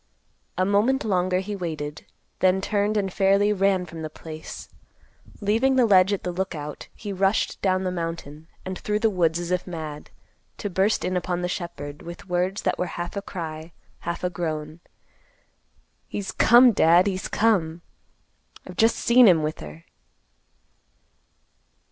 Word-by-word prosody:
A 185 - +2
moment 220 +7 +2
longer 185 -2 +1
he 205 +2 -5
waited, 155 -5 -5 0.3
then 185 0 +3
turned 205 +1 0
and 195 -3 -1
fairly 200 +1 +3
ran 195 -2 +1
from 165 -1 -9
the 155 - -4
place. 155 0 -9 0.7
Leaving 225 +6 +2
the 255 -2 +5
ledge 190 -2 +5
at 200 - -2
the 180 - -2
Lookout, 170 -5 -5
he 205 -2 -6
rushed 195 +2 0
down 185 -1 +1
the 185 - -1
mountain 165 -3 -5 0.2
and 185 0 -5
through 210 0 -1
the 220 +1 +2
woods 170 -3 +1
as 175 0 -4
if 180 0 -1
mad, 155 -4 -7 0.5
to 205 - -4
burst 195 +4 +1
in 185 - -1
upon 180 0 -2
the - - 0
shepherd, 150 -5 -6
with 170 +3 -10
words 180 +2 -1
that - - 0
were 180 - 0
half 175 +2 -5
a 200 - -2
cry, 160 -4 -7 0.3
half 170 +1 -5
a 180 - 0
groan. 155 -2 -4 1.3
"He's 200 -2 -4
come, 245 +1 +6
Dad; 175 -2 +5
he's 190 -2 -2
come. 175 -7 +1 0.8
I've - - -10
just 225 0 +4
seen 240 0 +5
him 165 -5 +5
with 155 +1 -3
her." 75 +2 -10
185 Hz, 160 wpm, -24 LUFS, 165-200 Hz, 1.3 s, come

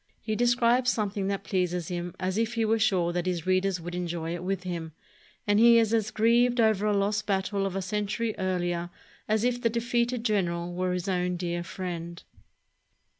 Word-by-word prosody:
He 215 0 -3
describes 240 +1 +3
something 205 -3 -2
that 200 0 -2
pleases 180 -3 -1
him 175 -1 -4
as 185 +2 -1
if 230 +1 -1
he 225 -1 +1
were 225 +1 +2
sure 180 -5 +2
that 175 +1 -2
his 175 -3 -2
readers 185 0 +1
would 175 +1 -7
enjoy 170 -2 -3
it 175 0 -5
with 190 0 -2
him; 170 -3 -5 0.5
and 205 0 +3
he 235 0 +7
is 225 -1 +3
as 220 -2 +1
grieved 235 +2 +3
over 215 -2 +3
a 205 -1 +2
lost 205 +1 0
battle 195 0 0
of 190 - -5
a 195 - -2
century 210 +3 -2
earHer 175 -2 -1 0.4
as 215 0 +1
if 245 0 0
the 230 - +2
defeated 235 +1 0
general 175 -5 0
were 180 0 -1
his 180 0 -3
own 180 -1 0
dear 175 -1 -2
friend. 170 -1 -6
195 Hz, 190 wpm, -27 LUFS, 175-220 Hz, 0.5 s, he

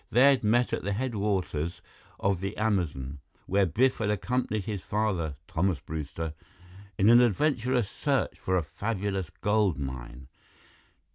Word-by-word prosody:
They 130 +4 +6
had 135 -3 +1
met 120 +3 +2
at - - 0
the 100 +2 -2
headwaters 100 - -1 0.4
of 95 -2 +1
the 100 +3 -4
Amazon, 80 -11 -1 0.3
where 100 0 +2
Biff 130 +10 +2
had 110 -2 0
accompanied 110 0 -1
his 105 -4 -3
father, 95 -9 -1
Thomas 90 0 0
Brewster, 80 +1 -5 0.6
in 100 - +3
an 120 +1 +8
adventurous 125 -1 +2
search - - -1
for 95 0 0
a 85 - +1
fabulous 95 +2 -3
gold 105 -6 +1
mine. 65 -2 -6
100 Hz, 140 wpm, -28 LUFS, 85-110 Hz, 0.6 s, an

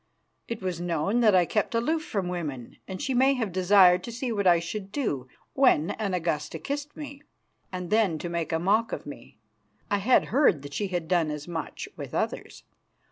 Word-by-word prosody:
It 230 -4 -5
was 180 -2 -3
known 175 +6 0
that 215 -5 +5
I 180 -1 +5
kept 210 +5 -1
aloof 310 +8 0
from 195 -10 -2
women, 150 -9 -5
and 190 -1 -6
she 270 - -1
may 265 +2 +4
have 225 -6 -2
desired 185 0 +5
to 235 - -6
see 240 +1 -3
what 200 -3 0
I 175 -1 +7
should 190 +4 -6
do 145 - -2 0.3
when 250 - +3
an 200 -4 -2
Augusta 165 -2 -2
kissed 285 - -5
me, 285 -2 -8 0.5
and 180 -2 -5
then 210 -7 +3
to 175 - -5
make 170 -1 -3
a 160 - +2
mock 210 +7 +2
of - - -5
me. 140 -5 -11 0.5
I 205 - +2
had 245 +6 +3
heard 240 - +4
that 145 0 -9
she 205 - -1
had 175 -3 -3
done 170 -3 +2
as 150 +1 -5
much 165 -2 -5
with - - -7
others. - - -3
185 Hz, 200 wpm, -27 LUFS, 170-230 Hz, 0.5 s, I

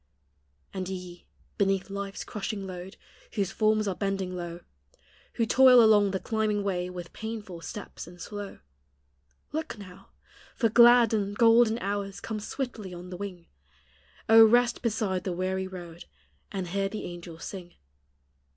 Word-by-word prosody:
And 185 -1 -4
ye, 180 -2 -8 0.3
beneath 195 -1 +1
life's 200 0 -5
crushing 200 -1 -4
load 185 +1 -8 0.4
Whoso 195 -3 -1
forms 215 -1 +2
are 195 - 0
bending 195 -1 -2
low; 175 -1 -6 0.7
Who 230 - +1
toil 255 +2 +7
along 210 -2 +5
the 190 0 -2
climbing 215 -1 -1
way 180 -2 -1
With 180 -1 -8
painful 215 -6 -6
stops 205 0 -8
and 175 0 -13
slow, 205 - -7 0.4
— 70 0 -43
Look 315 -4 -4
now! 195 -1 -13 0.5
for 230 -3 +2
glad 235 0 +7
and 205 -1 -1
golden 230 -1 +5
hours 200 -2 -3
Come 215 +1 -4
swiftly 215 -5 -5
on 180 +1 -9
the 180 - -6
wing; 185 -3 -7 0.8
O, 225 0 +9
rest 240 +2 +4
beside 215 -5 -1
the 185 - -2
weary 190 +1 -2
road, 175 -2 -9 0.5
And 190 -3 -4
hear 195 +2 -1
the 215 - -5
angels 170 -1 -9
sing. 180 -3 -8
195 Hz, 150 wpm, -28 LUFS, 180-220 Hz, 0.8 s, O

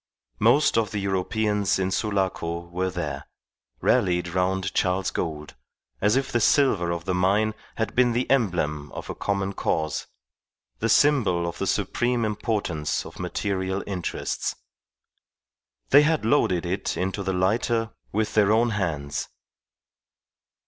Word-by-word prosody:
Most 145 -5 +4
of 110 - -1
the 105 - -4
Europeans 100 +1 0
in 95 0 -1
Sulaco 95 -5 -1
were 90 +2 -1
there, 75 -6 -4 0.5
rallied 90 -2 +2
round 95 +2 0
Charles 95 +1 +1
Gould, 75 -3 -4 0.5
as 105 +3 +3
if 135 0 0
the 120 - +2
silver 105 - +3
of 85 -1 -3
the 95 - 0
mine 100 +4 +2 0.2
had 110 -3 -2
been 125 -1 +3
the 125 +2 0
emblem 85 - 0
of - - -6
a - - -4
common 100 -1 -2
cause, 80 -5 -1 0.7
the - - 0
symbol 110 -13 +3
of 85 - -6
the - - -1
supreme 120 -1 0
importance 105 -7 -2
of - - -11
material 95 +1 -2
interests. 90 -4 -3 1.4
They 145 - +9
had 150 -5 +1
loaded 95 -9 +2
it 95 +3 -2
into 95 +2 -2
the 95 -1 -1
lighter 115 +5 +1 0.2
with 110 +1 -1
their 105 -1 +4
own 115 +2 +3
hands. 75 -8 -2
95 Hz, 135 wpm, -25 LUFS, 90-110 Hz, 1.4 s, They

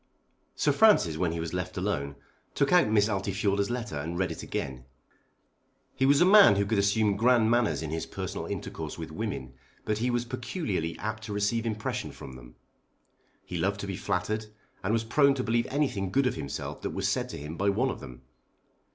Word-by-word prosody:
Sir - - +2
Francis 210 - +5
when 85 -1 0
he 85 - -4
was 80 0 -4
left 90 +1 -4
alone 80 -8 -2 0.4
took 140 - +2
out 180 -10 +6
Miss 105 -1 +4
Altifiorla's 100 0 0
letter 120 -10 -3
and 85 +4 -4
read 95 0 0
it - - -6
again. 65 -3 -5 1.1
He 135 0 +2
was 140 0 +5
a - - +7
man 200 - +8
who 100 0 +1
could 100 0 +1
assume 100 +1 +2
grand 115 +1 +4
manners 120 -8 +2
in 75 - -4
his 80 0 -3
personal - - -5
intercourse - - -5
with - - -7
women, 65 -1 -4 0.3
but 105 +1 -1
was 120 0 0
peculiarly 120 - -3
apt 110 +1 -4
to 105 - -5
receive 110 +3 0
impression 110 -1 -3
from 65 - -10
them. - - -13 0.9
He 90 - -5
loved 100 +4 0
to - - -4
be 95 -1 -4
flattered, 100 +4 -2 0.4
and 100 - 0
was 115 0 +1
prone 140 +4 +3
to 130 - -2
believe 115 0 +1
anything 130 -10 0
good 135 +7 +2
of 125 - +2
himself 70 - -5
that - - -3
was - - 0
said - - -1
to - - -6
him 75 +3 -7
by 100 +3 +1
one 100 - +1
of - - -7
them. 65 0 -11
100 Hz, 200 wpm, -28 LUFS, 90-120 Hz, 1.1 s, man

